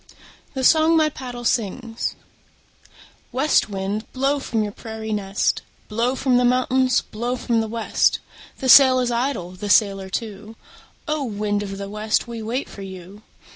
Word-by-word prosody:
THE 265 - -2
SONG 320 +4 +5
MY 310 -1 +4
PADDLE 245 -4 -8
SINGS 230 +1 -1 1.2
West 265 -1 +2
wind, 200 +2 -4
blow 275 +2 +1
from 225 -5 -1
your 205 - -3
prairie 220 0 -6
nest, 200 -1 0 0.3
Blow 235 +4 0
from 260 -2 +2
the 250 - +3
mountains, 255 0 +2
blow 240 +3 -4
from 235 -2 0
the 220 - -3
west. 225 0 +1 0.4
The 265 - -3
sail 260 0 +8
is 245 -1 0
idle, 235 -7 -1
the 195 +3 -6
sailor 195 -3 +3
too; 215 +1 -5 0.5
O! 305 -1 -1
wind 205 -3 -2
of 195 -1 -5
the 200 0 -5
west, 215 +2 -1
we 230 -1 -6
wait 235 +5 -3
for 200 - -11
you. 190 +1 -10
230 Hz, 160 wpm, -22 LUFS, 205-255 Hz, 1.2 s, sail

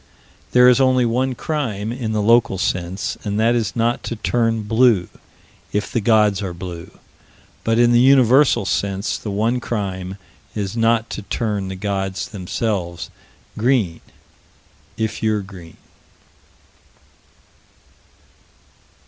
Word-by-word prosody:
There 125 0 +6
is 125 +2 +5
only 130 -1 +3
one 125 +2 0
crime, 115 -9 -3
in 120 -2 -3
the 105 -1 0
local 115 -2 +3
sense, 90 0 -2
and 105 0 -2
that 115 +2 +3
is 115 -5 -1
not 120 0 0
to 115 - -3
turn 115 0 0
blue, 110 -3 +3 0.6
if 105 0 -2
the 120 - 0
gods 105 -2 +3
are 95 -3 -4
blue: 85 -2 -8 0.7
but, 115 0 +1
in 120 0 +4
the 120 - +5
universal 130 -2 +5
sense, 100 +1 -1
the 105 - -6
one 110 +5 0
crime 95 -5 -4 0.4
is 100 -1 -3
not 115 0 +1
to - - -5
turn 105 -2 -2
the 95 - -5
gods 95 -1 -3
themselves 90 -3 -3 0.4
green, 110 -8 +1 1.0
if 110 -1 -3
you're 110 -1 +1
green. 90 -4 -13
110 Hz, 125 wpm, -20 LUFS, 95-120 Hz, 1.0 s, There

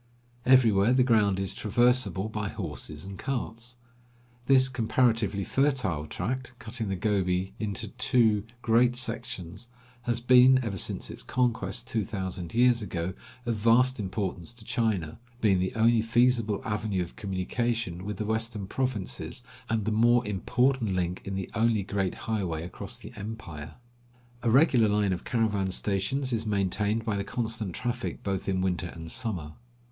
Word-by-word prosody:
Everywhere 115 -4 +5
the 130 0 +4
ground 105 -6 +3
is 95 -1 0
traversable 120 -2 +2
by 110 -2 -3
horses 75 -5 -5
and 95 -1 -8
carts. 120 -2 -4 0.7
This 130 -1 +6
comparatively 115 -4 +1
fertile 115 - 0
tract, 125 +9 -3
cutting 115 -2 -5
the 95 - -1
Gobi 95 -2 0
into 105 0 -2
two 115 -3 +3 0.2
great 120 +2 +4
sections, 115 -5 -4 0.4
has 120 0 +1
been, 125 +1 +6
ever 100 -5 -2
since - - -2
its - - -7
conquest 125 -1 0
two 110 -2 0
thousand 95 -2 -5
years 120 0 +4
ago, 90 -3 -3 0.3
of 115 -2 -1
vast 120 +4 +4
importance 95 +1 -3
to 115 -2 -13
China, 105 -9 -1 0.2
being 100 -5 +3
the 95 +1 -1
only 115 0 +4
feasible 115 -2 +2
avenue 105 -3 -1
of 85 - -11
communication 100 -1 -2
with 105 0 -4
the 105 - -2
western 110 -1 -1
provinces, 125 -2 -3 0.3
and 110 -3 0
the 110 - 0
more 120 +3 +4
important 115 +2 +1
link 90 0 -1
in 95 - -4
the 95 -1 -3
only 115 -2 +2
great 95 -2 -1
highway 90 -8 -1
across 100 +6 -7
the 120 - -11
empire. 100 -8 -7 0.7
A 120 - +1
regular 125 -3 +5
line 105 -2 +2
of 85 - -5
caravan 105 -5 0
stations 105 +8 -1
is 115 -1 0
maintained 105 +1 0
by 110 -3 0
the 100 - -1
constant 110 -5 -3
traffic 120 0 -3
both 95 -1 -2
in 95 -1 +1
winter 90 -1 -1
and 80 -1 -8
summer. 100 -11 -3
110 Hz, 150 wpm, -28 LUFS, 95-120 Hz, 0.7 s, This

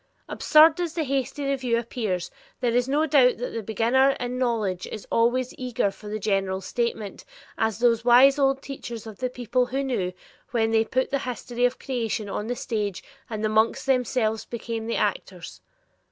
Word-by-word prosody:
Absurd 310 +2 +5
as 340 -2 -3
the 325 - 0
hasty 275 +1 -2
review 260 -4 0
appears, 220 -6 -3 0.3
there 245 -2 0
is 245 +2 +1
no 295 +3 +2
doubt 265 -5 +4
that 245 - -5
the 230 - -3
beginner 235 +6 +2
in 245 +1 -3
knowledge 215 -8 -1
is 215 - -7
always 245 +2 +2
eager 245 -5 0
for 210 - -13
the 210 +1 -3
general 195 -2 0
statement, 220 0 -3 0.3
as 220 -2 0
those 235 -1 +2
wise 260 +4 +6
old 270 0 +2
teachers 240 -5 -7
of 220 -3 -10
the 255 - -1
people 250 0 -1
well 270 +1 0
knew, 220 -9 -1 0.4
when 225 -2 +1
they 225 0 +4
put 260 +3 -1
the 275 - +1
history 245 -1 -2
of 245 +1 0
creation 230 -5 -3
on 210 +2 -4
the 245 - -2
stage 210 -6 -3 0.3
and 215 -2 -4
the - - +2
monks 220 +1 +1
themselves 250 -4 +1
became 230 -1 -5
the 230 - -1
actors. - - -3
240 Hz, 180 wpm, -25 LUFS, 220-260 Hz, 0.4 s, wise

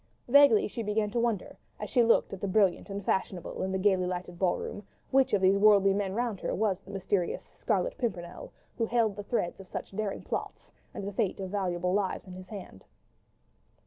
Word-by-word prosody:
Vaguely 275 -4 +6
she 230 - -5
began 210 -1 0
to 235 - 0
wonder, 230 -5 -1 0.2
as - - -4
she 250 - +3
looked 230 -3 +3
at 195 - -7
the 200 - -1
brilliant 195 0 +2
and 200 0 -5
fashionable 190 -2 -1
crowd - - -3
in 190 - -3
the 190 - 0
gaily 190 -2 +2
lighted 180 -1 -5
ball 185 -2 +2
room, - - -6 0.3
which 265 0 +4
of 195 -2 +2
these 195 +1 +5
worldly 200 -2 +6
men 195 -1 -1
round 235 -4 -1
her - - -2
was 200 -3 0
the - - -17
mysterious 190 -2 -1
"Scarlet - - -2
Pimpernel," 180 -8 -4 0.3
who 230 - +1
held 225 -3 +1
the 205 - -5
threads 200 -4 -2
of 190 - -11
such - - -6
daring 210 -2 -3
plots, - - -5 0.2
and 195 - -6
the 205 - -5
fate 205 -2 -1
of 190 -1 -5
valuable 180 -3 -1
lives 200 -1 -1
in 185 - -10
his 185 0 -10
hands. 185 - -10
200 Hz, 210 wpm, -29 LUFS, 185-215 Hz, 0.3 s, Vaguely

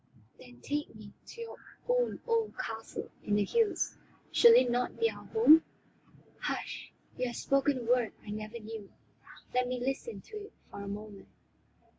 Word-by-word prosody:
"Then 245 -1 -14
take 295 -3 -3
me 210 -1 -11
to 465 - -9
your 460 - -7 0.3
own - - +2
old 460 -2 0
castle 225 0 -5
in 205 - +1
the 205 - +3
hills. 450 - +1 0.4
Shall 470 -1 +8
it 255 - +6
not 245 +1 -1
be 455 0 +3
our - - -11
home?" 325 -8 +7 0.8
"Hush, - - -4 0.3
you 250 - +1
have 240 - -5
spoken 275 0 +2
a - - -5
word 240 -1 +2
I 205 - -6
never 215 +2 -5
knew; 220 -2 -8 0.6
let 250 0 +2
me 250 0 -2
listen 270 - -3
to 430 - -9
it - - -21 0.2
for 200 - -7
a 200 - -6
moment." 205 0 -7
250 Hz, 170 wpm, -32 LUFS, -, 0.8 s, Shall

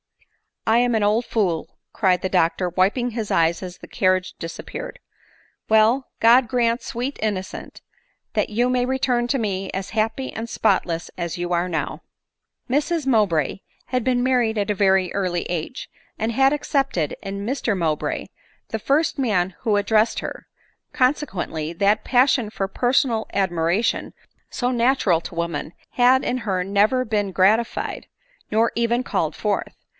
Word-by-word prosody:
" - - -38
I 225 - +5
am 245 -1 +2
an 215 - +1
old 215 +4 +2
fool," 180 -8 -1
cried 185 -4 +2
the 185 - -1
doctor, 180 0 +1
wiping 200 +8 +1
his 220 -2 -4
eyes 165 0 +2
as 180 -1 -7
the - - -11
carriage 185 -1 +1
disappeared. 165 - -7 0.4
" - - -36
Well; 220 +5 +4
God 235 +2 +6
grant, 235 0 +1
sweet 250 +3 -4
in 215 -1 0
nocent, 190 +2 -8 0.5
that - - 0
you 240 +4 +1
may 250 -1 +1
return 250 -2 0
to 275 - +1
me 195 -3 -2
as 190 0 -4
happy 225 +4 -1
and 225 +1 -5
spotless 175 -7 0
I - - -6
as 170 0 -4
you 175 0 -3
now - - 0
are 170 - +2
i - - -3
n 180 -2 -4
i - - -2 0.7
Mrs 300 +3 0
Mowbray 200 - +2 0.3
had 250 -1 -1
been 245 0 +1
married 245 -4 +2
at 205 -1 -1
a - - -1
very 190 -2 +2
early 180 -3 -1
age, 175 +8 -5 0.3
and 220 +1 -1
had 270 +4 +3
accepted 275 - -1
in 200 +1 -5
Mr 235 -4 -1
Mowbray 160 -4 -1 0.4
the 220 - -3
first 280 +6 +1
man 190 -8 +1
who 215 -4 +2
ad 205 - 0
dressed 220 +1 +3
her; - - -7 0.5
consequently, 190 - -1
that 200 +5 +2
passion 250 -3 +3
for 195 -2 -3
personal 245 +1 +1
ad 195 -2 +1
miration, 175 +6 0 0.4
so 245 0 -1
natural 235 -8 +2
to 170 - -9
women, 170 -1 -3 0.2
had 255 +1 +4
in 255 - -1
her 190 -5 -1
never 205 +7 +2
been 205 -3 -1
gratified, 210 +6 +1 0.4
nor 225 +2 +2
even 235 +1 +1
called - - -1
forth. - - -2
215 Hz, 170 wpm, -22 LUFS, 185-245 Hz, 0.7 s, God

